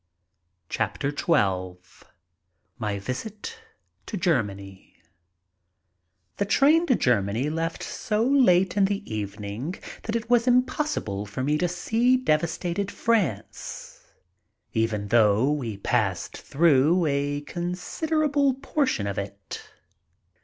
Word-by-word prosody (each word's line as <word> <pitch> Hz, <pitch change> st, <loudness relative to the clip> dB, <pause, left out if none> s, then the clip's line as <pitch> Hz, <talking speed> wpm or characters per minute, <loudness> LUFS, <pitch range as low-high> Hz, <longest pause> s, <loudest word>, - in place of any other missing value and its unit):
We -, -, +5 dB
leave. -, -, -5 dB
XII 95 Hz, -, -1 dB, 0.7 s
MY 105 Hz, -3 st, -2 dB
VISIT 160 Hz, -, -6 dB, 0.5 s
TO 210 Hz, -, -4 dB
GERMANY 100 Hz, -, -2 dB, 1.4 s
THE 200 Hz, -, +1 dB
train 305 Hz, -, +4 dB
to 255 Hz, -, +4 dB
Germany 120 Hz, -, +1 dB
left 165 Hz, +1 st, -2 dB
so 215 Hz, +1 st, -1 dB
late 190 Hz, -9 st, +4 dB
in 200 Hz, -1 st, +4 dB
the 200 Hz, +1 st, -1 dB
evening 105 Hz, -, -4 dB, 0.3 s
that 225 Hz, -, -3 dB
it 230 Hz, 0 st, -2 dB
was 240 Hz, 0 st, +3 dB
impossible 250 Hz, -, +1 dB
for 100 Hz, +6 st, -4 dB
me 150 Hz, +3 st, +2 dB
to 180 Hz, -, +2 dB
see 230 Hz, +8 st, +2 dB
devastated 175 Hz, -1 st, 0 dB
France -, -, -2 dB, 0.7 s
even 110 Hz, -3 st, 0 dB
though 115 Hz, +3 st, +4 dB
we 120 Hz, -9 st, -3 dB
passed 100 Hz, -3 st, -1 dB
through 160 Hz, +3 st, +3 dB
a 145 Hz, 0 st, 0 dB
considerable 280 Hz, -, 0 dB
portion 270 Hz, -, -1 dB
of 100 Hz, -1 st, -2 dB
it. 100 Hz, 0 st, -7 dB
165 Hz, 110 wpm, -25 LUFS, -, 1.4 s, We